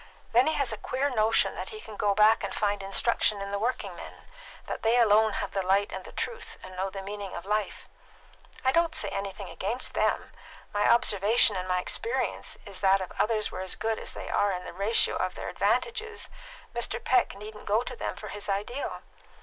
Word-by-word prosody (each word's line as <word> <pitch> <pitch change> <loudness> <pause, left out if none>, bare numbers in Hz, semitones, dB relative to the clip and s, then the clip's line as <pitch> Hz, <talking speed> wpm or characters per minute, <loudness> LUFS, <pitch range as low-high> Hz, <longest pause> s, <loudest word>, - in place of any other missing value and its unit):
Then 245 +4 +5
he 315 - +2
has 275 -6 +1
a - - -4
queer 270 +5 -1
notion 220 -2 +3
that - - -5
he 430 - -7
can 220 - -9
go 205 -1 +1
back 215 +2 +5
and - - -3
find 205 -1 0
instruction 200 +1 +2
in 200 0 -5
the 200 - -1
working 240 +4 -2
men - - -10 0.4
that - - -5
they 225 +2 +3
alone 220 -2 +5
have 200 - -3
the 195 - 0
light 195 +2 +2
and 190 - -5
the - - -9
truth, 475 - -4
and 185 0 -9
know 190 +1 -1
the 195 0 -7
meaning 200 -1 -6
of 175 - -6
life. 210 0 -2 0.8
I 260 - +5
don't 335 +2 +2
say 315 - 0
anything 195 -1 -4
against 230 +7 -3
them. - - 0 0.4
My 205 0 +3
observation 215 -1 +4
and 185 0 -3
my 180 0 +1
experience 455 - -1
is - - -5
that 195 0 +4
if 185 - -5
others 215 -1 +2
were - - -5
as 190 -1 -2
good 225 0 -1
as - - -6
they - - -7
are 205 0 +2
in 180 -1 -3
the - - -8
ratio 200 +5 +2
of - - -1
their - - -5
advantages, 450 -1 0 0.4
Mr. 240 0 0
Peck 250 -5 +3
needn't 210 +1 -10
go 215 +4 +3
to 250 - -6
them - - -3
for 210 - -8
his 205 0 -6
ideal. 210 +7 -3
210 Hz, 215 wpm, -28 LUFS, 195-235 Hz, 0.8 s, Then